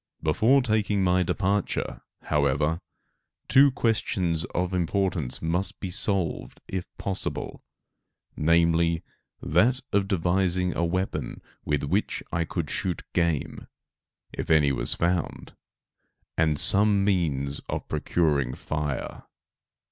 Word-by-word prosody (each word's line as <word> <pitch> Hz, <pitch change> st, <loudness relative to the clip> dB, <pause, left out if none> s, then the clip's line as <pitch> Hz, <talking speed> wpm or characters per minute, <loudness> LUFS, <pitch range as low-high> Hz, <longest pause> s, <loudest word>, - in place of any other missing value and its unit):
Before 115 Hz, -, +3 dB
taking 105 Hz, -4 st, +1 dB
my 90 Hz, 0 st, +3 dB
departure, 100 Hz, +2 st, -1 dB, 0.2 s
however, 75 Hz, +2 st, +1 dB, 0.7 s
two 140 Hz, +2 st, +6 dB
questions 95 Hz, -9 st, 0 dB
of 90 Hz, +1 st, -2 dB
importance 90 Hz, -6 st, -1 dB
must 90 Hz, +4 st, -1 dB
be 95 Hz, -, -5 dB
solved, 95 Hz, -3 st, +2 dB
if 95 Hz, -2 st, -4 dB
possible, 95 Hz, -1 st, -3 dB, 0.7 s
namely, 85 Hz, +1 st, +2 dB, 0.4 s
that 120 Hz, -, +2 dB
of 100 Hz, -1 st, +2 dB
devising 90 Hz, -1 st, 0 dB
a 85 Hz, -, 0 dB
weapon 85 Hz, -5 st, -2 dB, 0.3 s
with 75 Hz, -2 st, 0 dB
which 95 Hz, +9 st, -1 dB
I 85 Hz, -1 st, 0 dB
could 80 Hz, -2 st, -4 dB
shoot 90 Hz, -3 st, -2 dB
game, 85 Hz, -4 st, -1 dB, 0.7 s
if -, -, -5 dB
any 75 Hz, -3 st, +4 dB
was -, -, +2 dB
found; 85 Hz, 0 st, -2 dB, 0.8 s
and 80 Hz, -2 st, +1 dB
some 100 Hz, +2 st, +3 dB
means 75 Hz, -8 st, 0 dB
of -, -, -4 dB
procuring 75 Hz, -4 st, 0 dB
fire. 75 Hz, -3 st, -4 dB
85 Hz, 110 wpm, -26 LUFS, 75-95 Hz, 0.8 s, two